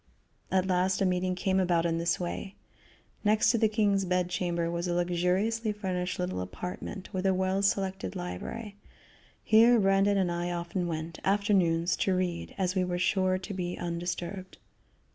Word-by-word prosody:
At 190 Hz, -1 st, +2 dB
last 185 Hz, 0 st, +1 dB
a 195 Hz, -, +2 dB
meeting 185 Hz, 0 st, 0 dB
came 190 Hz, +1 st, +1 dB
about 175 Hz, -2 st, +2 dB
in 165 Hz, -1 st, 0 dB
this 170 Hz, +1 st, 0 dB
way: 185 Hz, +2 st, -4 dB, 0.7 s
Next 215 Hz, 0 st, +4 dB
to 235 Hz, -, +1 dB
the 220 Hz, -, +4 dB
king's 205 Hz, -2 st, +2 dB
bed 180 Hz, -1 st, 0 dB
chamber 170 Hz, -2 st, -1 dB
was 170 Hz, +1 st, -2 dB
a 175 Hz, -, 0 dB
luxuriously 180 Hz, +6 st, +1 dB
furnished 185 Hz, -3 st, -3 dB
little 180 Hz, -, -2 dB
apartment 180 Hz, -, -6 dB
with 185 Hz, -1 st, -2 dB
a 190 Hz, -, +3 dB
well 190 Hz, +1 st, 0 dB
selected 190 Hz, -, -1 dB
library. 200 Hz, -, -6 dB, 0.7 s
Here 230 Hz, +2 st, +6 dB
Brandon 195 Hz, 0 st, +3 dB
and 185 Hz, -3 st, +1 dB
I 175 Hz, +1 st, -2 dB
often 175 Hz, +1 st, -2 dB
went, 160 Hz, 0 st, -4 dB
afternoons, 190 Hz, -4 st, +2 dB
to 190 Hz, -, +1 dB
read, 180 Hz, -2 st, -2 dB
as 185 Hz, -2 st, 0 dB
we 185 Hz, -1 st, +1 dB
were 180 Hz, -1 st, -2 dB
sure 185 Hz, 0 st, +2 dB
to 185 Hz, +2 st, -7 dB
be 180 Hz, -2 st, -3 dB
undisturbed. 175 Hz, +2 st, -4 dB
185 Hz, 165 wpm, -29 LUFS, 175-195 Hz, 0.7 s, Here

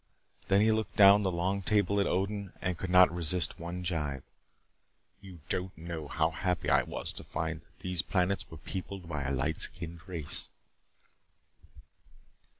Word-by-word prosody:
Then 100 Hz, +1 st, +4 dB
he 110 Hz, +1 st, +4 dB
looked 110 Hz, 0 st, -1 dB
down 100 Hz, 0 st, +8 dB
the 95 Hz, -, +1 dB
long 95 Hz, +3 st, -1 dB
table 100 Hz, 0 st, +2 dB
at 100 Hz, -, +2 dB
Odin 100 Hz, +1 st, -2 dB
and 90 Hz, 0 st, -1 dB
could 90 Hz, +2 st, -5 dB
not 90 Hz, -1 st, +6 dB
resist 85 Hz, +1 st, +3 dB
one 85 Hz, +2 st, -5 dB
gibe. 75 Hz, -6 st, -2 dB, 1.0 s
"You 95 Hz, -4 st, -12 dB
don't 95 Hz, 0 st, -3 dB
know 80 Hz, -2 st, -6 dB
how 80 Hz, +3 st, +1 dB
happy 90 Hz, +3 st, -1 dB
I -, -, +5 dB
was -, -, -4 dB
to -, -, -9 dB
find 80 Hz, +1 st, -4 dB
that -, -, -27 dB
these 90 Hz, -2 st, -1 dB
planets 90 Hz, +2 st, 0 dB
were -, -, -9 dB
peopled 95 Hz, -1 st, -7 dB
by 75 Hz, -3 st, -3 dB
a 70 Hz, -, -2 dB
light 70 Hz, +4 st, -1 dB
skinned 85 Hz, +1 st, -4 dB
race." 85 Hz, -6 st, -3 dB
90 Hz, 160 wpm, -31 LUFS, 80-95 Hz, 1.0 s, down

